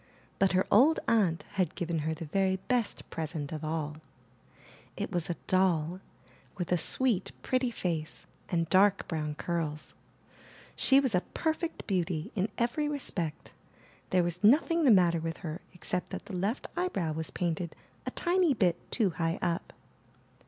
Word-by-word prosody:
But 195 Hz, -1 st, +3 dB
her 185 Hz, +1 st, +3 dB
old 275 Hz, +10 st, +6 dB
aunt 190 Hz, -8 st, +2 dB, 0.2 s
had 175 Hz, -, -1 dB
given 170 Hz, -3 st, -1 dB
her 160 Hz, +1 st, -1 dB
the 165 Hz, -, -6 dB
very 190 Hz, +4 st, +1 dB
best 235 Hz, +3 st, -1 dB
present 155 Hz, -2 st, -4 dB
of 155 Hz, -1 st, -5 dB
all; 155 Hz, -1 st, -2 dB, 1.0 s
it -, -, -3 dB
was 175 Hz, -1 st, -1 dB
a 175 Hz, -, 0 dB
doll, 180 Hz, -2 st, +2 dB, 0.6 s
with 180 Hz, -1 st, -3 dB
a -, -, +5 dB
sweet 230 Hz, -1 st, +1 dB
pretty 255 Hz, -1 st, +1 dB
face 165 Hz, -8 st, -3 dB, 0.2 s
and 165 Hz, -2 st, +1 dB
dark 195 Hz, +3 st, +4 dB
brown 150 Hz, -2 st, -2 dB
curls. 155 Hz, -2 st, -3 dB, 0.8 s
She 270 Hz, -, +5 dB
was 265 Hz, -5 st, +1 dB
a 180 Hz, -, +3 dB
per 315 Hz, -, -1 dB
fect 335 Hz, 0 st, -5 dB
beauty 180 Hz, 0 st, -1 dB
in 200 Hz, 0 st, 0 dB
every 245 Hz, +6 st, 0 dB
respect. 175 Hz, -, -3 dB, 0.6 s
There 185 Hz, -1 st, +3 dB
was 175 Hz, +2 st, -3 dB
nothing 315 Hz, +8 st, +5 dB
the -, -, +6 dB
matter 175 Hz, -4 st, +5 dB
with 165 Hz, 0 st, -4 dB
her 160 Hz, +2 st, -4 dB
except 180 Hz, 0 st, -2 dB
that -, -, -6 dB
the 200 Hz, -2 st, -6 dB
left 200 Hz, +8 st, -1 dB
eyebrow 270 Hz, -, -1 dB
was 160 Hz, 0 st, -4 dB
painted 170 Hz, -1 st, -2 dB, 0.3 s
a -, -, +2 dB
tiny 345 Hz, -4 st, +2 dB
bit 180 Hz, -6 st, +2 dB
too 210 Hz, -7 st, +2 dB
high 165 Hz, 0 st, -1 dB
up. 170 Hz, +3 st, -1 dB
180 Hz, 160 wpm, -30 LUFS, 165-220 Hz, 1.0 s, old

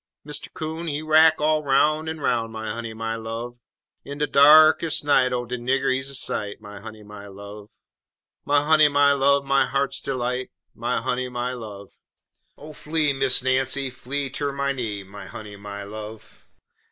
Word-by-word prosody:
Mister 150 Hz, 0 st, -5 dB
Coon, 160 Hz, +2 st, -6 dB
he 150 Hz, 0 st, -3 dB
rack 155 Hz, +1 st, +5 dB
all 155 Hz, 0 st, +1 dB
'roun' 150 Hz, +3 st, +2 dB
en 160 Hz, 0 st, -5 dB
'roun', 115 Hz, -5 st, -1 dB
My 110 Hz, -1 st, -5 dB
honey, 115 Hz, +1 st, -5 dB
my 115 Hz, 0 st, -3 dB
love! 115 Hz, +2 st, -6 dB, 0.4 s
In 140 Hz, -, -8 dB
de 150 Hz, -, +1 dB
darkes' 155 Hz, +3 st, +6 dB
night, 135 Hz, -3 st, +3 dB
oh, 120 Hz, -1 st, -2 dB
de 125 Hz, +1 st, -5 dB
nigger, 130 Hz, +2 st, +1 dB
he's 135 Hz, +1 st, -3 dB
a 140 Hz, -, -5 dB
sight! 105 Hz, -4 st, -2 dB
My 105 Hz, -1 st, -11 dB
honey, 110 Hz, 0 st, -10 dB
my 105 Hz, -1 st, -11 dB
love! 100 Hz, +1 st, -11 dB, 0.7 s
My 145 Hz, 0 st, +2 dB
honey, 155 Hz, -1 st, +6 dB
my 145 Hz, 0 st, +4 dB
love, 140 Hz, 0 st, +2 dB
my 135 Hz, 0 st, +2 dB
heart's 140 Hz, 0 st, -1 dB
delight 125 Hz, -1 st, -3 dB, 0.2 s
My 120 Hz, +2 st, -2 dB
honey, 125 Hz, 0 st, -2 dB
my 125 Hz, 0 st, -3 dB
love! 105 Hz, -5 st, -9 dB, 0.7 s
Oh, 150 Hz, +2 st, -11 dB
flee, 150 Hz, -1 st, 0 dB
Miss 135 Hz, -2 st, +2 dB
Nancy, 130 Hz, +1 st, 0 dB
flee 135 Hz, +2 st, -4 dB
ter 145 Hz, +1 st, -3 dB
my 140 Hz, 0 st, -1 dB
knee, 110 Hz, -7 st, -4 dB
My 100 Hz, +1 st, -11 dB
honey, 105 Hz, -2 st, -9 dB
my 100 Hz, 0 st, -8 dB
love! 110 Hz, +1 st, -10 dB
130 Hz, 175 wpm, -23 LUFS, 110-145 Hz, 0.7 s, darkes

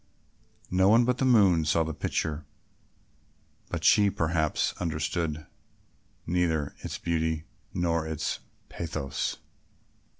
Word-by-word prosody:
No 95 Hz, +1 st, +4 dB
one 115 Hz, +3 st, +6 dB
but 125 Hz, 0 st, 0 dB
the 135 Hz, -, +2 dB
moon 100 Hz, -10 st, +5 dB
saw 80 Hz, +2 st, +2 dB
the 80 Hz, 0 st, -4 dB
picture, 75 Hz, +1 st, -2 dB, 1.3 s
but -, -, -4 dB
she 105 Hz, -1 st, +6 dB
perhaps 80 Hz, -3 st, 0 dB
understood 80 Hz, -1 st, -2 dB, 0.8 s
neither 80 Hz, -4 st, 0 dB
its -, -, -5 dB
beauty 80 Hz, -2 st, -1 dB, 0.3 s
nor 85 Hz, -2 st, 0 dB
its 80 Hz, -2 st, -2 dB, 0.3 s
pathos. 80 Hz, -5 st, -3 dB
80 Hz, 105 wpm, -28 LUFS, 80-90 Hz, 1.3 s, one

